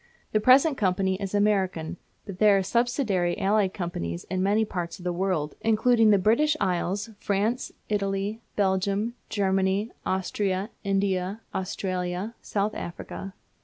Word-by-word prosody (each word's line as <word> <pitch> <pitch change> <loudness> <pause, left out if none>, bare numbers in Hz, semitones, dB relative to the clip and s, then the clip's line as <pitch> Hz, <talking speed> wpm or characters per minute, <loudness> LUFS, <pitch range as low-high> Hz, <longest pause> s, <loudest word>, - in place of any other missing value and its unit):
The 215 - +3
present 270 +6 +5
company 190 0 +1
is 195 0 -3
American, 190 -5 +1 0.3
but 195 -2 -8
there 210 -2 +6
are 195 - +1
subsidiary 235 -6 +1
allied 200 -1 +2
companies 85 - -4
in 185 -1 0
many 205 +3 +2
parts 175 -4 -4
of 180 - -13
the 180 -1 -1
world, 175 -5 -1
including 225 +1 +4
the 205 - +6
British 265 +11 +3
Isles, 195 +3 -1
France, 210 +5 0 0.2
Italy, 200 +1 -1
Belgium, 200 +3 +1 0.2
Germany, 195 +1 +1
Austria, 190 +2 -1
India, 195 0 0
Australia, 185 +2 -3
South 205 +1 -1
Africa. 190 +2 -7
195 Hz, 130 wpm, -26 LUFS, 185-215 Hz, 0.3 s, there